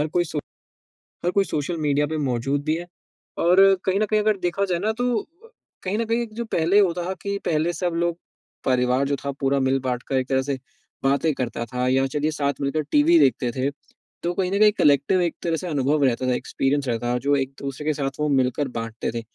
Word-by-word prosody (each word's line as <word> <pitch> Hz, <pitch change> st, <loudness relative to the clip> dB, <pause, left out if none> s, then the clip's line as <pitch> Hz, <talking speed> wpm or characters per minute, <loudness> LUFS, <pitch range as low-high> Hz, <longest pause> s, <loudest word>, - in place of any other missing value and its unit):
हर 150 Hz, -, +1 dB
कोई 175 Hz, +2 st, +1 dB
सो 155 Hz, -2 st, -4 dB, 0.9 s
हर 175 Hz, -, +2 dB
कोई 200 Hz, -, +3 dB
social 155 Hz, +3 st, -2 dB
media 145 Hz, +1 st, +2 dB
पे 155 Hz, 0 st, -3 dB
मौजूद 135 Hz, +4 st, -1 dB
भी 155 Hz, -, +1 dB
है 175 Hz, +1 st, -7 dB, 0.5 s
और 180 Hz, +3 st, +5 dB, 0.2 s
कहीं 190 Hz, +1 st, +2 dB
न 215 Hz, -, +2 dB
कहीं 215 Hz, +1 st, +1 dB
अगर 210 Hz, -1 st, +2 dB
देखा 195 Hz, +3 st, 0 dB
जाए 180 Hz, -3 st, -1 dB
ना 215 Hz, +4 st, 0 dB
तो 245 Hz, +1 st, 0 dB
अ, 370 Hz, +9 st, -20 dB, 0.3 s
कहीं 195 Hz, +2 st, -1 dB
न 230 Hz, -, 0 dB
कहीं 230 Hz, +2 st, 0 dB
एक 220 Hz, -2 st, -6 dB
जो 235 Hz, +1 st, -4 dB
पहले 170 Hz, +5 st, +4 dB
होता 180 Hz, -1 st, +1 dB
कि 200 Hz, 0 st, -2 dB
पहले 160 Hz, +2 st, +1 dB
सब 175 Hz, -1 st, -2 dB
लोग 170 Hz, -1 st, -1 dB, 0.5 s
परिवार 125 Hz, +1 st, +2 dB
जो 140 Hz, -, +1 dB
था 140 Hz, -, 0 dB
पूरा 135 Hz, 0 st, +2 dB
मिल-बाँट 130 Hz, -2 st, 0 dB
कर 135 Hz, -, -1 dB
एक 130 Hz, -1 st, -1 dB
तरह 130 Hz, -1 st, +2 dB
से 135 Hz, -, -3 dB, 0.4 s
बातें 140 Hz, +3 st, +2 dB
करता 120 Hz, -2 st, -3 dB
था 125 Hz, +2 st, -2 dB
या 135 Hz, +1 st, +3 dB
चलिए 150 Hz, +3 st, -1 dB
साथ 145 Hz, -2 st, 0 dB
मिलकर 140 Hz, +3 st, 0 dB
टीवी 315 Hz, +3 st, +5 dB
देखते 125 Hz, -, +3 dB
थे 130 Hz, +3 st, -1 dB, 0.5 s
तो 175 Hz, -, 0 dB
कहीं 185 Hz, +1 st, -1 dB
न 200 Hz, -, +1 dB
कहीं 210 Hz, -1 st, +7 dB
कलेक्टिव 145 Hz, +6 st, +3 dB
एक 170 Hz, -2 st, 0 dB
तरह 165 Hz, -1 st, 0 dB
से 180 Hz, -, -5 dB
अनुभव 145 Hz, -1 st, +1 dB
रहता 130 Hz, 0 st, 0 dB
था 125 Hz, -, +2 dB
एक्सपीरियंस 135 Hz, +2 st, -1 dB
रहता 120 Hz, +1 st, 0 dB
जो 145 Hz, 0 st, +4 dB
एक-दूसरे 135 Hz, +1 st, -4 dB
के 155 Hz, -, +3 dB
साथ 135 Hz, -1 st, -4 dB
वो 150 Hz, -, +1 dB
मिलकर 135 Hz, +1 st, +1 dB
बाँटते 115 Hz, 0 st, -4 dB
थे। 115 Hz, 0 st, -4 dB
150 Hz, 225 wpm, -23 LUFS, 135-180 Hz, 0.9 s, कहीं